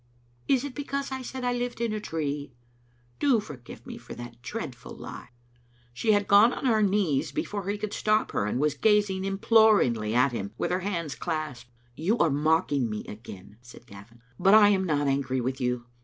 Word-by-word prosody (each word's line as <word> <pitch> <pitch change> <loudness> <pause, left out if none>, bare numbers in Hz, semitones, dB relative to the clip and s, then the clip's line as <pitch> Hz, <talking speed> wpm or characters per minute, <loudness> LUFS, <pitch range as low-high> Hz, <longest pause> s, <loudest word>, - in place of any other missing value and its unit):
Is 265 -2 +3
it 285 -2 -5
because 280 -1 -4
I 265 0 -4
said 260 0 -6
I 245 0 +1
lived 245 -1 -3
in 230 -2 -1
a 215 - -2
tree? 145 -7 -4 0.6
Do 270 -5 +3
forgive 140 - -10
me - - -8
for - - -10
that 120 0 -10
dreadful 130 - -7
lie." - - -9 0.6
She 215 - +2
had 205 -1 +1
gone 205 +4 +7
on - - -5
her 225 -4 +3
knees 175 -8 +1
before 200 +6 -3
he 205 - -1
could 210 0 -4
stop 215 0 +1
her, 100 - -1
and 115 - -1
was 150 0 +2
gazing 205 +2 +2
imploringly 195 - +3
at 125 +2 +4
him, 100 -3 -5
with - - -1
her 180 - +1
hands 170 -6 -3
clasped. 150 -7 -4 0.3
"You 185 - 0
are 170 -8 +3
mocking 145 -3 +1
me 105 0 -5
again," 100 -2 -11
said 120 -1 -15
Gavin, 110 +4 -15 0.2
"but 195 +2 +6
I 210 -1 +8
am 190 -2 +2
not 145 -4 +1
angry 135 -1 0
with 130 +2 -3
you. 125 -1 -1
160 Hz, 195 wpm, -27 LUFS, -, 0.6 s, I